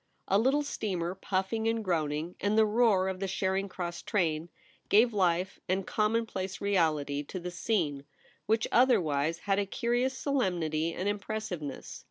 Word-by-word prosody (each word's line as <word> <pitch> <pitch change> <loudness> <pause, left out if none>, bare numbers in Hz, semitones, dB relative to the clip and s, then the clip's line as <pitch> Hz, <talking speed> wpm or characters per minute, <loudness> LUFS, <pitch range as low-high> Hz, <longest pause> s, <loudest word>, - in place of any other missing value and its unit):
A 195 - +3
little 270 +6 +3
steamer 185 -10 -2
puffing 190 +4 -1
and 225 -1 0
groaning, 160 -1 -1
and 205 +2 +1
the 220 - +6
roar 210 -4 +3
of 190 -1 -3
the 195 - -2
Charing 190 +1 -1
Cross 175 -2 -5
train, 165 -5 0 0.4
gave 230 +3 +5
life 185 -1 +1
and 190 0 0
commonplace 215 -3 -1
reality 155 -8 +1
to 165 +6 -6
the 180 0 -5
scene, 170 -8 -1 0.4
which 220 +1 +2
other 245 -1 +5
wise 155 0 0
had 195 0 +1
a 200 - +1
curious 245 +5 0
solemnity 170 - 0
and 185 - -2
impressive 205 -3 -3
ness. 140 -3 -7
190 Hz, 160 wpm, -30 LUFS, 170-220 Hz, 0.4 s, the